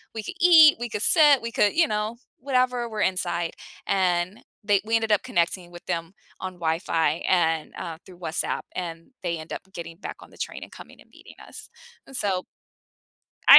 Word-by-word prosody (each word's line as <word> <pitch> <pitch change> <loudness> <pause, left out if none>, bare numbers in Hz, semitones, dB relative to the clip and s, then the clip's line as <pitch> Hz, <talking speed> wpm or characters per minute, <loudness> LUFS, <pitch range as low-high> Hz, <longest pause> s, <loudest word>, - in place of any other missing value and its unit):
we 220 - -3
could 370 - -6
eat, 325 -4 +8
we 240 0 -3
could 210 - -3
sit, 295 -5 +6
we 230 0 -4
could, 210 -2 +3
you 330 0 +4
know, 215 +2 -2 0.2
whatever. 250 -2 +1
We're 215 -2 -3
inside. 175 -3 0 0.3
And 185 +1 +1 0.2
they 205 -1 +3
we 225 +1 +1
ended 225 -1 +1
up 210 - +4
connecting 175 +1 -1
with 175 0 -12
them 165 +2 -3 0.3
on 185 0 -5
Wi-Fi 165 -1 0
and, 165 -3 +2
uh 165 -2 -5
through 185 -2 -14
WhatsApp, 165 -2 -2
and 165 +2 -6
they 170 -2 -1
end 155 - -8
up - - -5
getting 165 -2 -7
back - - -7
on - - -14
the - - -17
train - - -5
and - - -12
coming - - -13
and - - -20
meeting - - -15
us. - - -11 0.4
And 270 - -9
so 190 -5 0 1.0
I - - +13
190 Hz, 195 wpm, -25 LUFS, 170-230 Hz, 1.0 s, I